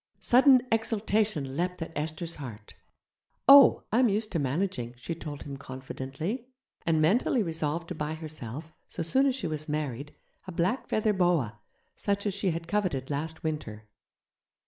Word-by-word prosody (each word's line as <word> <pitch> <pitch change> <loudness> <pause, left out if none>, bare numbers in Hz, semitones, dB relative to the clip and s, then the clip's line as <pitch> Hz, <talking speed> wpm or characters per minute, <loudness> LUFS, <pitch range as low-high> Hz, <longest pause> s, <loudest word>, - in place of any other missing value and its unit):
Sudden 255 0 +6
exultation 215 - 0
leaped 180 +3 -1
at 165 - -9
Esther's 160 +3 -4
heart. 115 -7 -9 0.7
'Oh! 275 -2 +9
I'm 240 +1 +4
used 210 +1 -1
to 170 - 0
managing' 135 -4 -2
she 165 - -4
told 150 -3 -7
him 140 -1 -7
confidently, 135 - -5 0.4
and 160 -1 +3
mentally 215 +8 +3
resolved 165 -1 -2
to - - -3
buy 155 -1 -3
herself, 155 -1 -7 0.2
so - - -4
soon 265 - +3
as 260 - +1
she 265 - -4
was 155 -1 -4
married, 145 -2 -3 0.3
a - - -5
black 180 +9 0
feather 215 0 +1
boa, 170 - +1 0.3
such 200 0 -2
as 205 - 0
she 200 -1 0
had 165 0 -3
coveted 170 -9 -1
last 160 +3 -4
winter. 150 -9 -4
165 Hz, 155 wpm, -28 LUFS, 145-200 Hz, 0.7 s, Oh